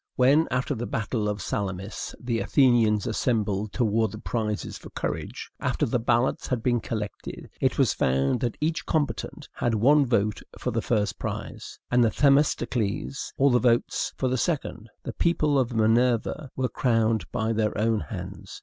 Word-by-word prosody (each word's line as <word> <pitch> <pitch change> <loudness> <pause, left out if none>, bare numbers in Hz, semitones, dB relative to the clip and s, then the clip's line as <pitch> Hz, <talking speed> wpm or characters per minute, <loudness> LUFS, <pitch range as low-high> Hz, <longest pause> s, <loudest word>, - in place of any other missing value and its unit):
When, 140 +6 +4
after 130 +3 0
the 120 -1 -4
battle 110 -1 -1
of 105 -2 -3
Salamis, 95 0 -4
the 120 -2 -2
Athenians 115 -7 +3
assembled 105 -3 0
to 125 - +1
award 110 -1 +1
the - - -6
prizes 105 -2 -3
for - - -11
courage, - - -5
after - - 0
the 120 +2 0
ballots 120 +2 +1
had 120 -3 -2
been 120 -1 +2
collected, 105 -2 -6
it - - +1
was - - +3
found 65 - +1
that 120 -3 -2
each 160 +2 -1
combatant 150 -3 -2
had 120 -2 0
one 140 +6 +4
vote 105 -3 +1 0.2
for 125 - -2
the 115 0 -1
first 105 -3 0
prize, - - -6
and 125 0 +5
Themistocles 125 -2 +1
all 140 0 +4
the 125 - +4
votes 120 -1 +1
for 130 - 0
the 130 0 0
second. 115 -9 -2
The - - -5
people 155 -4 +2
of 125 -1 0
Minerva 115 +5 +2
were 130 -1 0
crowned 115 -3 +1
by 115 -1 0
their 110 -1 0
own 110 +1 +2
hands. 75 - -8
115 Hz, 170 wpm, -26 LUFS, 110-130 Hz, 0.2 s, and